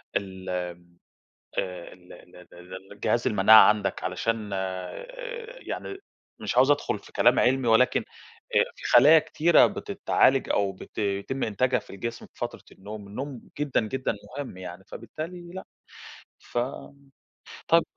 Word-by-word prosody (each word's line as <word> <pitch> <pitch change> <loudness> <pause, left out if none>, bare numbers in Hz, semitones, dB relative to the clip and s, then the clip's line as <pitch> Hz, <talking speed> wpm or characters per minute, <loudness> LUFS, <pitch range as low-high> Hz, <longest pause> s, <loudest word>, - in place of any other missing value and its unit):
ال 95 -2 -4
ال 90 -1 -5 0.6
آآ، 90 -2 -4
ال 90 0 -16 0.4
ال 90 +3 -11
الجهاز 115 +3 -1
المناعة 110 -1 +8
عندك، 105 -3 0
علشان 105 +4 -2
آآ 95 -1 -4 0.6
يعني 390 - -6 0.4
مش - - -3
عاوز 135 +3 +5
أدخل 145 - +1
في - - -17
كلام - - +4
علمي، 125 -1 +2
ولكن 115 +3 +4 0.7
في - - -13
خلايا 145 +7 +9
كتيرة 165 +2 +4
بتتعالج - - +1
أو 100 -1 +1
بت 95 - -9
بيتم 100 +6 -2
إنتاجها 125 +4 +1
في - - -13
الجسم 115 +4 -6
في - - -34
فترة - - -5
النوم، 105 +1 -9
النوم 130 +3 -6 0.2
جدًا 145 -2 +1
جدًا 125 +3 -2 0.2
مهم 135 -9 -6
يعني، 90 0 -9
فبالتالي 175 +2 -8
لا، 190 - -7 0.7
ف - - -5 1.1
طيب 165 0 +5
105 Hz, 135 wpm, -26 LUFS, 95-130 Hz, 1.1 s, خلايا